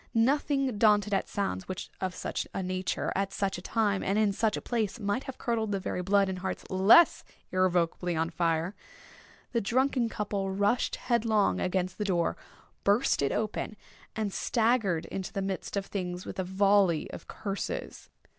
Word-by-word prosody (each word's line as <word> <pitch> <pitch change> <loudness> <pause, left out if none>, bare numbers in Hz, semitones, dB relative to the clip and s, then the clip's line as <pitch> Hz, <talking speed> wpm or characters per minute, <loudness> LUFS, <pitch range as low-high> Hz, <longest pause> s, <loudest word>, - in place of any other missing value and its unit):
Nothing 270 0 +2
daunted 210 -1 +4
at 195 - +1
sounds 95 - -2
which, 185 - -6
of 185 -1 -2
such - - -3
a 190 - -1
nature, 185 0 -2
at 195 0 0
such 195 -2 -1
a - - -10
time, 205 -1 0
and 195 +2 0
in 215 -2 +3
such 215 +1 +1
a - - -2
place, 225 -2 -2
might 205 +5 -1
have 265 -2 -7
curdled 225 -3 -1
the 200 - 0
very 180 - -3
blood 195 +2 +3
in 190 -1 -3
hearts 190 +1 -4
less 195 - +6 0.3
irrevocably 180 -1 +1
on 165 +1 0
fire, 165 +1 0 0.8
the 235 - +1
drunken 250 +2 +1
couple 205 -3 -2
rushed 200 +5 +1
headlong 225 -4 +1
against 185 +1 -1
the - - +1
door, 175 -4 +1 0.5
burst 205 - +3
it 140 - +1
open, 215 0 -2 0.4
and 215 -3 -2
staggered 220 -8 +1
into 190 -1 -4
the 200 - -3
midst 195 +1 -3
of 195 - -1
things 180 -3 -4
with - - -7
a - - +1
volley 190 -3 +3
of - - -9
curses. 200 -2 -5
200 Hz, 175 wpm, -29 LUFS, 185-220 Hz, 0.8 s, less